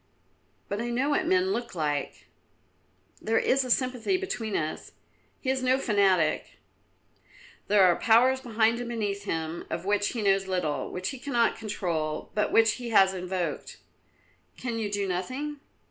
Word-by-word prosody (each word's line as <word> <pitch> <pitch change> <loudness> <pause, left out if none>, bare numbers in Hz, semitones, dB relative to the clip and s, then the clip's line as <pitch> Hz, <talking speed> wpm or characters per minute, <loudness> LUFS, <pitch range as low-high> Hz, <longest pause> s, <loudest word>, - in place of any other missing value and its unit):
"But 205 +2 -3
I 240 - -3
know 255 +5 0
what 340 +4 +1
men 370 +1 +2
look 240 - -3
like; 145 -3 -2 1.0
there 225 +1 +1
is 270 +1 +2
a 255 - -6
sympathy 255 - +1
between 370 - -4
us; 155 0 -4 0.5
he 260 - 0
is 265 0 -1
no 255 +1 +3
fanatic." 200 -9 +1 1.1
"There 205 -1 +5
are 180 -2 +5
powers 250 +3 +4
behind 230 -1 +1
and 245 -1 -5
beneath 205 -4 -3
him 160 -2 -3
of 170 - -4
which 205 0 +1
he 230 -3 -3
knows 195 -1 +2
little, 180 -6 -2
which 185 0 -3
he 270 - -7
cannot 240 -4 +1
control, 170 -8 -3
but 210 - 0
which 225 -1 +4
he 245 -1 -6
has 195 -4 +5
invoked." 180 -1 -4 0.8
"Can 235 -2 -3
you 215 -2 -2
do 200 -1 -1
nothing?" 255 +12 -3
220 Hz, 160 wpm, -27 LUFS, 190-255 Hz, 1.1 s, There